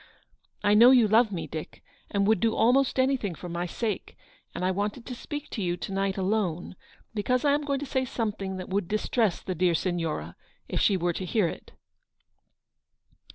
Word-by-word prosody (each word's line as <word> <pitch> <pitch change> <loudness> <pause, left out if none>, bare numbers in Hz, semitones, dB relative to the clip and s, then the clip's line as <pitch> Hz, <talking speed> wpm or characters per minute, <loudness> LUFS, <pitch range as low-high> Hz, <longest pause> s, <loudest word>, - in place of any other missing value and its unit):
I 205 - +4
know 230 +4 +8
you 250 -4 +6
love 220 +1 +4
me, 165 -4 -3
Dick, 155 +1 -8 0.3
and 200 -1 +1
would 220 -1 +3
do 225 +2 +1
almost 255 +4 +3
anything 260 -9 +1
for 180 - -8
my 175 +1 -3
sake, 215 +2 -4 0.4
and 180 - -2
I 185 - +2
wanted 205 +5 -3
to 255 - -6
speak 295 +4 -6
to 220 - -3
you 175 -2 -1
to - - -6
night 195 0 -1
alone, 185 -3 -1 0.4
because 250 +5 0
I 285 - +5
am 295 - +1
going 280 -2 -2
to - - -3
say 260 -1 0
something 210 -6 -3
that 185 - -7
would 195 -1 -1
distress 215 -1 0
the 185 - -3
dear 175 0 +2
Signora, 170 -3 -2 0.3
if - - -1
she 200 - +4
were 175 0 0
to 185 - -4
hear 195 0 +2
it." - - -8
205 Hz, 195 wpm, -27 LUFS, 180-235 Hz, 0.4 s, know